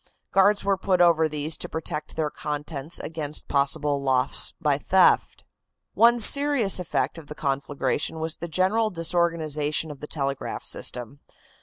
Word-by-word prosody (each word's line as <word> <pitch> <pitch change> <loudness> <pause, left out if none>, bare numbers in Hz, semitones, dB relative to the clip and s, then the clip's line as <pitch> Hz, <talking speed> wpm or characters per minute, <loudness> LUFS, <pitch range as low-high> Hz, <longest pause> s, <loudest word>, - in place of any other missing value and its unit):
Guards 200 +2 +3
were 195 -1 +1
put 185 -1 0
over 165 -2 +4
these 155 +1 -1
to - - -6
protect 155 -1 -5
their 155 -2 -2
contents 150 +1 -5
against 155 -2 -3
possible 140 0 0
loss 130 -2 +1
by - - +1
theft. - - +2 0.5
One 235 +3 +5
serious 275 -4 +4
effect 175 -1 -2
of 155 - -14
the 150 - -8
conflagration 140 +2 -2
was 160 0 -3
the 170 - -6
general 190 +7 +1
disorganization 160 -4 -1
of 145 - -11
the 150 - -8
telegraph 140 -3 -4
system. 125 +3 -3
160 Hz, 145 wpm, -24 LUFS, 145-180 Hz, 0.5 s, One